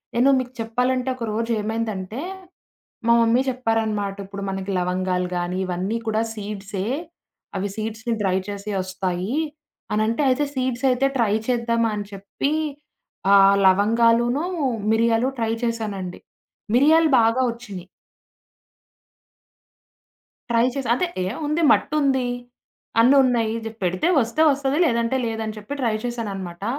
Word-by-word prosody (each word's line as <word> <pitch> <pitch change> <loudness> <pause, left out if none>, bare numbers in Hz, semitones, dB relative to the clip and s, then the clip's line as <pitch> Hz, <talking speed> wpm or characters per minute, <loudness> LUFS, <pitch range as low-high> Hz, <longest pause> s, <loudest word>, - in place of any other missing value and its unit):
నేను 250 +3 +4
మీకు 250 -1 -5
చెప్పాలంటే 250 +3 0
ఒక 250 - -7
రోజు 230 +2 -1
ఏమైందంటే, 220 -1 -3 0.9
మా 235 - +5
మమ్మీ 230 +2 +4
చెప్పారనమాట. 225 -5 -1
"ఇప్పుడు 200 0 -7
మనకి 195 0 -4
లవంగాలు 180 0 -1
గానీ 175 +1 -2
ఇవన్నీ 185 +4 -2
కూడా 220 0 +1
సీడ్సే. 200 -2 -5 0.7
అవి 195 +1 -1
సీడ్స్‌‌ని 220 +1 -3
డ్రై 190 -2 +1
చేసి 200 +1 -5
ఒస్తాయి" 185 +4 -3 0.6
అనంటే 220 +6 +1
అయితే 260 +3 +2
సీడ్స్ 255 -1 -2
అయితే 255 +2 +2
ట్రై 225 -5 +2
చేద్దామా 230 -2 +1
అని 205 -1 -4
చెప్పీ, 200 +8 -3 0.8
ఆహ్, 195 0 +7
లవంగాలూను, 230 - +3 0.5
మిరియాలు 230 +2 +2
ట్రై 225 -1 0
చేశానండి. 210 -6 -3 0.6
మిరియాలు 315 +4 +5
బాగా 230 +3 +3
ఒచ్చినీయి. 205 -7 -9 2.6
ట్రై 235 0 +3
చేసి. 275 -3 -3
అదే 360 - 0 0.2
ఏ! - - -1 0.2
ఉంది 305 +3 0
మట్టుంది, 275 -4 +1 0.7
అన్ని 250 +5 +6
ఉన్నాయి. 235 -4 +1
జె 225 - -4
పెడితే 185 - 0
వస్తే 235 +7 -1
వస్తది, 275 0 0
లేదంటే 235 -2 +1
లేదని 220 -1 -3
చెప్పి 210 +6 -7
ట్రై 230 -3 +1
చేశాననమాట. 195 -7 -5
225 Hz, 120 wpm, -23 LUFS, 200-245 Hz, 2.6 s, ఆహ్